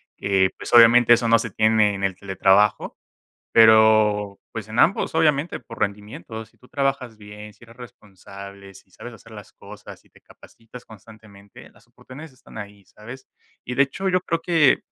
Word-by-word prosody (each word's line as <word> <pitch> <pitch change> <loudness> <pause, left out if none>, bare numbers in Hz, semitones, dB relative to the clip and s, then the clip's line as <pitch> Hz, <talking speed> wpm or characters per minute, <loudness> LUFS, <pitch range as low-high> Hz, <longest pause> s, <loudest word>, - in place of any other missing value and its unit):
que, 95 -1 0
eh, 95 - 0
pues, - - -9
obviamente, 120 0 +6
eso 120 0 0
no 115 0 +3
se 115 - -5
tiene 110 0 +1
en 100 - -7
el 95 -1 -2
teletrabajo. 95 +2 0 0.6
Pero, 110 -2 +4
pues, 110 -1 -8
en 110 - -7
ambos, 185 - +1
obviamente, 155 0 0
por 115 - -14
rendimiento, 105 +1 -6
si - - -30
tú 125 - -22
trabajas 135 -5 -3
bien, 105 0 -13
si 120 - -20
eres 115 0 -19
responsable, 100 -4 -14
si 95 - -19
sabes 120 +6 -12
hacer 115 0 -17
las 105 -2 -13
cosas - - -14
y - - -29
te - - -23
capacitas 115 +2 -17
constantemente, 105 -2 -17
las - - -26
oportunidades 145 +4 -14
están 130 -3 -15
ahí, 100 -1 -11
¿sabes? 120 +7 -14 0.4
Y, 125 - -6
de 140 - +3
hecho, 165 +8 -4
yo 185 0 0
creo 165 -2 -4
que 165 -5 +1
110 Hz, 180 wpm, -21 LUFS, 100-125 Hz, 0.6 s, obviamente